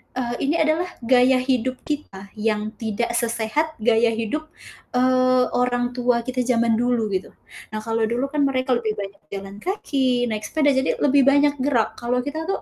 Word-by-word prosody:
eee, 240 -1 -2
ini 285 +3 +1
adalah 320 +3 +1 0.2
gaya 255 +2 +4
hidup 255 -1 0
kita 200 -10 -5
yang 215 0 -1
tidak 230 +1 -2
sesehat 235 +8 -1
gaya 230 +1 +3
hidup, 265 +8 -3 0.5
eee, 255 0 +3
orang 245 0 +1
tua 245 -1 +2
kita 255 0 -1
zaman 235 -2 +2
dulu, 240 -3 +1
gitu. 185 0 -3 0.4
Nah - - -2
kalau 225 0 0
dulu 245 +4 -1
kan 295 -2 +2
mereka 260 -1 0
lebih 220 -2 -2
banyak 200 0 -7
jalan 195 0 -7
kaki, 265 -10 0
naik 215 -1 -3
sepeda, 295 -2 +2
jadi 265 +1 +1
lebih 280 -1 +4
banyak 285 +1 +4
gerak, 255 -5 +1
kalau 250 +1 0
kita 315 +4 -4
tuh 390 - -2
250 Hz, 170 wpm, -22 LUFS, 230-275 Hz, 0.5 s, gaya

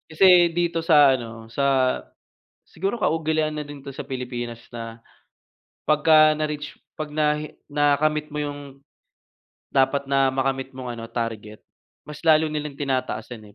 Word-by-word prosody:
Kasi 175 +1 +6
dito 170 -1 0
sa 145 -4 +6
ano, 115 -3 -6
sa 135 -1 +2 0.6
siguro 195 +4 -3
kaugalian 155 -1 0
na 150 - -4
din 145 -2 -10
'to 140 - -7
sa 135 - -7
Pilipinas 120 -2 -5
na, 115 -1 -8 0.8
pagka 155 0 +5
na-reach 150 -1 -4 0.2
‘pag 155 -1 -5
nahi 150 0 -1
nakamit 150 +1 +1
mo 150 - -5
yung 145 -1 -4 1.1
dapat 140 +1 +2
na 135 -1 +3
makamit 135 0 -2
mong 125 -2 -6
ano, 115 - -7
target, 110 -3 -5 0.4
mas 150 - -10
lalo 160 -1 +5
nilang 150 -2 -4
tinataasan 120 -5 -3
eh, - - -30
145 Hz, 135 wpm, -23 LUFS, 125-155 Hz, 1.1 s, Kasi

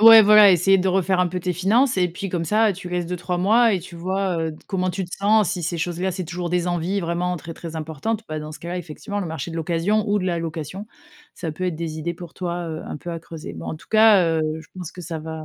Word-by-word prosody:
Ouais, 225 0 +10
voilà, 210 -1 +8
essayer 190 +2 +4
de 190 - +1
refaire 185 0 +2
un 180 - +2
peu 180 +1 -4
tes 180 +1 -1
finances 210 - +2
et 180 - +3
puis 185 +3 -6
comme 170 -2 -2
ça 215 +4 +3
tu 180 -1 -8
laisses 180 0 -1
2-3 180 +1 -3
mois 220 +5 +4
et 185 - -1
tu 175 0 -11
vois, 185 +1 -1
heu, 160 0 -1
d 155 - -13
comment 185 -2 -1
tu 185 +2 -2
te 175 - -7
sens. 210 0 +3
Si 175 - -3
ces 170 +2 -2
choses-là, 175 +2 -1
c'est 185 0 -4
toujours 175 +1 -4
des 180 0 0
envies 175 +3 -1
vraiment 175 +1 -1
très, 165 0 -8
très 165 0 -8
importantes, 160 +8 -3
bah 155 0 -4
dans 150 0 -6
ce 155 - -9
cas 170 - -8
là, 180 - -2
effectivement 180 +5 -5
le 185 - -3
marché 160 0 -5
de 165 - -6
l'occasion 175 +7 0
ou 205 0 +2
de 185 - -3
la 175 -2 0
location 165 +4 -5 0.5
ça 160 -3 -4
peut 185 +4 -4
être 180 -3 -1
des 160 -1 -4
idées 170 +2 -3
pour 175 -1 -10
toi, 175 -1 -4
heu, 160 -1 -5
un - - -5
peu 170 +4 -7
à 165 -1 -5
creuser. 160 - -8
Bon 80 -1 -8
en - - -4
tout - - -18
cas, 215 -4 +6
heu, 165 -1 +1 0.2
je - - -17
pense 180 -3 -6
que 180 - -10
ça 165 0 -5
va 160 0 -6
180 Hz, 285 wpm, -23 LUFS, 165-195 Hz, 0.5 s, Ouais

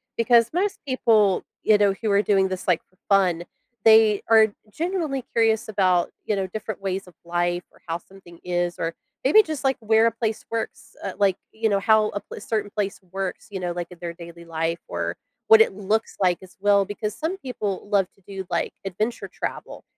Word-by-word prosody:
because 230 0 +4
most 390 +4 0
people, 215 -7 +3 0.2
you 215 - +5
know, 205 -1 +3
who 220 - 0
are 200 - +4
doing 195 -2 +3
this, 185 0 -5
like, 175 -3 +3
for 185 - -34
fun, 185 -4 +3 0.4
they 220 -2 +6
are 220 -1 +7 0.2
genuinely 320 - -2
curious 225 -2 +2
about, 185 -4 +2 0.2
you 210 - 0
know, 195 -1 -1
different 215 +1 -6
ways 195 0 -2
of 180 - -15
life 175 +1 0
or - - -23
how 165 +1 -1
something 175 -2 -16
is 175 -1 -1
or 165 0 -1 0.3
maybe 300 +12 +7
just, 310 -6 -5
like, 270 -1 +2
where 220 +1 +4
a 230 - +2
place 225 -1 -3
works, 230 0 -5
uh, 195 - -3
like, 195 -2 +3 0.2
you 220 0 0
know, 200 -1 +2
how 215 +1 +4
a 205 - -4
pl - - -11
a - - -8
certain 210 -1 -2
place 200 -2 -2
works, 190 -1 -4
you 190 - -4
know, 175 -1 -2
like, 175 -1 -4
in 180 - -11
their 170 -1 -5
daily 170 0 -11
life, 165 +1 -2
or 85 0 -3 0.3
what 220 0 +8
it 210 - +4
looks 210 +3 -1
like, 180 -2 +3
as 185 - -15
well, 200 -1 +4
because 210 +1 -4
some 340 +5 -2
people 210 - -4
love 200 -3 +3
to 195 - -29
do, 195 -1 -6
like, - - -1
adventure 215 +5 -2
travel. - - -6
200 Hz, 205 wpm, -24 LUFS, 180-220 Hz, 0.4 s, what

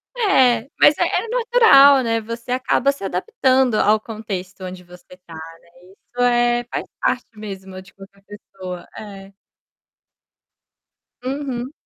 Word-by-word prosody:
É, 265 - +2
mas 290 - +6
é - - +1
é 460 - -1
natural, 450 - +5
né, 230 -1 0
você 230 +2 -8
acaba 260 +1 +1
se 280 - -12
adaptando 255 +7 0
ao 215 0 +3
contexto 200 -4 -7
onde 180 0 -9
você 180 +1 -16
tá, 165 - -13
né, 165 +1 -12 0.2
isso 245 +5 -9
é 240 0 +2
faz - - -4 0.2
parte 250 - 0
mesmo 190 -3 -9
de 185 - -19
qualquer 195 0 -17
pessoa, 190 -3 -10
é. 195 -2 -11 1.9
Uhum. 265 -1 -4
225 Hz, 130 wpm, -20 LUFS, 195-260 Hz, 1.9 s, mas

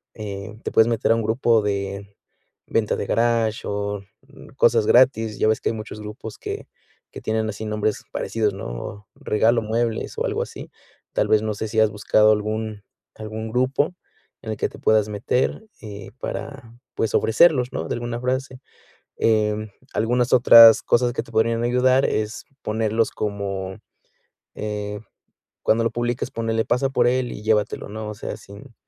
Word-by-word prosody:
eh, 105 -1 -6
te - - -3
puedes 110 - +5
meter 115 -1 +1
a - - +1
un 115 - -1
grupo 115 0 +2
de 100 0 -3 0.5
venta 110 -2 +1
de - - -3
garaje 115 -1 +1
o 100 0 -3 0.5
cosas 115 -3 +4
gratis. 115 -4 +4
Ya - - +3
ves 110 0 +1
que - - 0
hay - - -2
muchos 110 -1 -7
grupos 105 +1 -8
que - - -6 0.4
que - - -9
tienen 110 0 -1
así 110 +1 -6
nombres 105 0 -1
parecidos, 110 -3 -1
¿no? 95 +5 -7
Regalo 115 +2 +2
muebles 115 +1 -2
o - - 0
algo - - -1
así. - - -10 0.4
Tal - - +1
vez 110 - +4
no 110 0 -2
sé 110 - -4
si 110 +1 0
has 110 -1 +4
buscado 105 +1 +3
algún 110 0 -2 0.3
algún 110 +1 -6
grupo 130 +7 0 0.5
en 110 - -5
el 110 - -4
que - - 0
te - - -13
puedas 110 -1 +3
meter, 105 - -1 0.2
eh, 100 -3 -9
para, 125 -5 -7 0.2
pues, 115 - -1
ofrecerlos, 125 +2 +4
¿no?, 80 - -3
de - - -2
alguna 120 0 -4
frase. 130 +1 -2 0.6
Em, 110 -1 +1 0.2
algunas 120 +3 +1
otras 115 -2 +9
cosas 120 0 +2
que 120 - -2
te 115 - -16
podrían 115 +1 +1
ayudar 130 +2 +3
es 110 0 -2 0.2
ponerlos 110 +1 0
como, 100 -2 -4 0.8
eh, 105 -1 -4 0.6
cuando 115 +1 +3
lo 115 - +1
publicas, 120 0 -2
ponle, 115 0 -1
pasa 125 +3 +1
por 125 -3 +2
él 125 0 0
y - - -8
llévatelo, 110 -1 0
¿no? 110 +1 -6
O 105 - -6
sea, - - -6
sin 110 +6 -14
110 Hz, 170 wpm, -22 LUFS, 105-120 Hz, 0.8 s, otras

